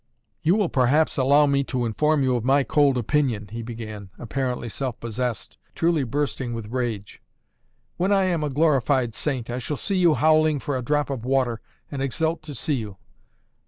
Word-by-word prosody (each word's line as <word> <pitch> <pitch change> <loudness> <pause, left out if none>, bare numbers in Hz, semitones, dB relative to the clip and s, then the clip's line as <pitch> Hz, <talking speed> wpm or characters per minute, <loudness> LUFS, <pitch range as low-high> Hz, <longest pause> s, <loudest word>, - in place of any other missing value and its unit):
"You 170 +5 +3
will 210 -4 +2
perhaps 140 +3 +2
allow 140 +3 +4
me 140 -1 +2
to 125 -2 -2
inform 150 +6 +1
you 130 -1 +2
of 120 - -2
my 135 +2 +3
cold 140 -2 +3
opinion," 120 -4 0
he 115 +1 -5
began, 110 -4 -7
apparently 125 0 -3
self 125 +1 -4
possessed, 115 -3 -4 0.2
truly 165 -3 +2
bursting 130 -2 -2
with 110 -1 -7
rage: 115 -5 -3 0.8
"when 185 +3 +1
I 195 -1 +4
am 175 -4 0
a 150 - -1
glorified 135 -4 +2
saint, 125 -4 -3
I 125 - -3
shall 145 +4 -4
see 195 +6 -1
you 170 -4 +4
howling 155 -1 +3
for 140 +1 -3
a 130 - -1
drop 145 +3 0
of 130 -4 -4
water 130 -3 0 0.3
and 140 -2 -4
exult 160 +5 -1
to 145 - -6
see 150 +5 -1
you. 105 -5 -6
135 Hz, 185 wpm, -24 LUFS, 120-150 Hz, 0.8 s, allow